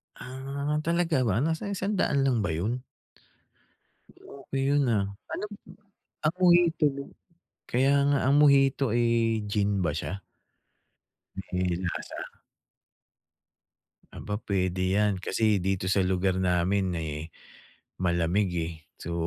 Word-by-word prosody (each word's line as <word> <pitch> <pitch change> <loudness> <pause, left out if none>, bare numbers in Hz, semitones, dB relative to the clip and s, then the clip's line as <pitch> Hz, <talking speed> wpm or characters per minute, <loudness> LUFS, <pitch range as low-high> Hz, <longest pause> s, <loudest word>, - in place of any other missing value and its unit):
Ah, 140 +3 -4
talaga 165 -5 +1
ba? 110 +6 +1
Nasa 160 +5 -1
100 195 -8 0
lang 130 -4 +2
ba 100 - 0
'yon? 110 +9 -1 1.3
Okey 135 -1 -7
'yon, 145 -1 +3
ah. 100 - 0 0.3
Ano - - -3 0.8
ang 155 +4 +2
mojito 175 -3 +5
rin 140 0 -7 0.6
kaya 135 +3 +3 0.2
nga 140 -1 +3
ang 140 - +4
mojito, 140 -1 +5
eh, 115 -2 +2
gin 100 -1 +1
ba 80 - +1
siya? 95 +7 -4 1.3
May 90 0 0 0.2
lasa? 85 - -4 2.0
Aba, 105 0 -4
puwede 95 -2 -1
'yan. 105 -1 +2
Kasi 105 +2 +1
dito 95 0 -1
sa 95 0 +3
lugar 95 0 +1
namin, 90 +1 +1
eh, 80 0 -5 0.7
malamig, 90 +2 +1
eh, 85 0 -2 0.3
so 85 - -5
105 Hz, 115 wpm, -27 LUFS, 95-140 Hz, 2.0 s, mojito